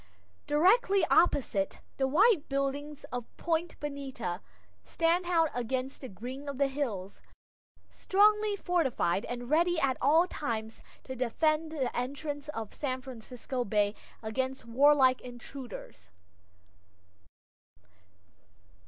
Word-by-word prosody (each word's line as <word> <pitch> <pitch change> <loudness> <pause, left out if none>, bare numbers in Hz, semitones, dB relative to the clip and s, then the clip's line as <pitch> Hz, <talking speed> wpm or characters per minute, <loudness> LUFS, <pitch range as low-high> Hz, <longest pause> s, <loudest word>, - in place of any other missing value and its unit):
Directly 380 +5 +4
opposite, 240 - +2 0.2
the 265 - +2
white 365 - +4
buildings 280 +2 -2
of 245 -1 -3
Point 335 0 -1
Bonita 270 -10 -4 0.4
stand 340 +2 +1
out 330 -3 +3
against 255 +2 -3
the 260 - -7
green 255 +9 -7
of 280 - -5
the 280 - +3
hills; 220 -9 -4 0.7
strongly 420 +1 +3
fortified, 295 - 0
and 245 0 -5
ready 340 +2 +3
at 265 -4 +1
all 315 +6 +5
times 225 -10 -4 0.2
to 260 - -6
defend 310 +6 +1
the 275 -6 -2
entrance 285 +3 -4
to 225 -6 -4
San 260 -3 -3
Francisco 250 +1 -5
Bay 205 -1 +1 0.3
against 260 +3 -2
warlike 260 +1 +5
intruders. 240 - -10
275 Hz, 110 wpm, -30 LUFS, 245-315 Hz, 0.7 s, all